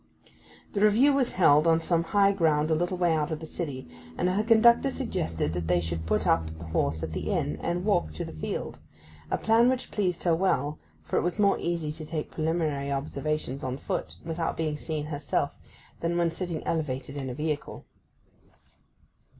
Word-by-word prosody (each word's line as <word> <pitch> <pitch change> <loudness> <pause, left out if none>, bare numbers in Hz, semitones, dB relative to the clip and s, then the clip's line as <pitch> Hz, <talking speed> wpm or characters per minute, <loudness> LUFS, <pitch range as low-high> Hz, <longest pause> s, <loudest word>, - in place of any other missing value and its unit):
The 200 - -1
Review 225 +7 +5
was 270 -3 +1
held 155 -3 +5
on 165 0 +5
some 165 0 +1
high 200 +2 +4
ground 160 -5 +2
a - - +5
little 175 +3 0
way 175 -2 +3
out 155 -1 0
of 160 -2 -3
the 160 - -7
city, 145 - -5 0.3
and - - +1
her 190 +4 +1
conductor 235 +4 +5
suggested 80 - -2
that 85 -1 -3
they 90 0 +3
should 80 -1 -4
put - - +1
up 80 0 +2
the 80 - -9
horse 80 0 -1
at 80 0 -4
the - - -3
inn, 75 +1 -1
and 175 +2 -2
walk 195 - +2
to 75 - -4
the - - -7
field—a 80 0 -6
plan 230 +2 +4
which 255 0 -2
pleased 185 -4 -1
her 170 -2 +3
well, 150 -5 0 0.2
for - - -2
it - - +3
was 175 +3 -1
more 200 -2 +3
easy 170 -3 -1
to 155 +1 -7
take 155 0 -4
preliminary 155 -3 -1
observations 145 0 -2
on 130 0 -2
foot - - -4
without 165 0 -2
being 155 -2 -1
seen 150 0 -3
herself 145 -1 -1 0.5
than 170 +1 -1
when 170 -1 +2
sitting 170 -2 -4
elevated 140 -4 -2
in 135 -2 -4
a 125 - -5
vehicle. 150 -1 -3
160 Hz, 190 wpm, -28 LUFS, 140-180 Hz, 0.5 s, Review